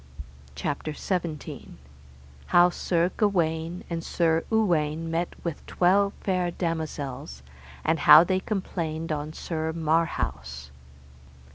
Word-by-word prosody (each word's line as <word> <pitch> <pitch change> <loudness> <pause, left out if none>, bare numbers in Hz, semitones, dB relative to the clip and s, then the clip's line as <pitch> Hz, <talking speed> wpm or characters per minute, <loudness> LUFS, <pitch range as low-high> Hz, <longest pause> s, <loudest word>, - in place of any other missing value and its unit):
CHAPTER 145 - -3
XVII. 170 -2 -4 0.7
How 175 0 +5
Sir 175 0 0
Gawaine 170 -4 0
and 165 -1 -4
Sir 165 -1 +1
Uwaine 165 -7 +1
met 170 +1 -2
with 170 -4 -4
twelve 200 +3 +3
fair 185 -2 0
damosels, 155 - -4 0.4
and 160 +1 +2
how 155 +2 +9
they 185 +1 +1
complained 165 -5 -3
on 150 0 -3
Sir 160 -1 -3
Marhaus. 75 - -1
165 Hz, 105 wpm, -26 LUFS, 155-175 Hz, 0.7 s, how